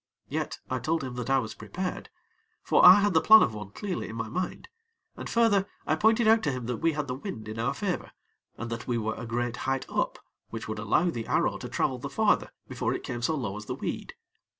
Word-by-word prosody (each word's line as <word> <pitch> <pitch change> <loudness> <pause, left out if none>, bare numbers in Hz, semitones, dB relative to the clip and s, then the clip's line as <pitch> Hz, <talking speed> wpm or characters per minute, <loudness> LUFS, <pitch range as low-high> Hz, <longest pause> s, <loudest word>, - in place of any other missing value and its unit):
Yet, - - -3
I 130 - -2
told 160 +6 -1
him 130 -2 -5
that 125 +1 -4
I 135 - +4
was 115 -4 -2
prepared; 185 0 -5 0.5
for - - +3
I 185 +3 +10
had 205 -1 +2
the 160 - +4
plan 220 0 +8
of 110 - 0
one 105 -2 -7
clearly 185 - -4
in 110 - -7
my 115 -1 -4
mind, 180 +1 -4 0.5
and - - -7
further 210 -4 +3 0.2
I - - +2
pointed 220 +1 +3
out 225 0 +6
to 150 - 0
him 125 -2 -4
that 125 0 -2
we 165 +5 +1
had 150 -1 -2
the 125 - -2
wind 130 - -7
in 110 +1 -6
our 125 +5 0
favor, 180 +3 -2 0.5
and 120 0 -5
that 115 -1 -5
we 120 -2 0
were 110 -1 -1
a 120 - -7
great 120 +1 -2
height 135 0 -1
up, - - -1 0.3
which 115 -1 -6
would 110 0 -4
allow 115 - +2
the 115 -5 -5
arrow - - +1
to - - -7
travel - - 0
the - - -5
farther - - +2 0.2
before - - -2
it - - -6
came 120 - -4
so 155 +6 +1
low 110 -9 -3
as 105 - -8
the - - -3
weed. - - -5
130 Hz, 245 wpm, -28 LUFS, 115-180 Hz, 0.5 s, I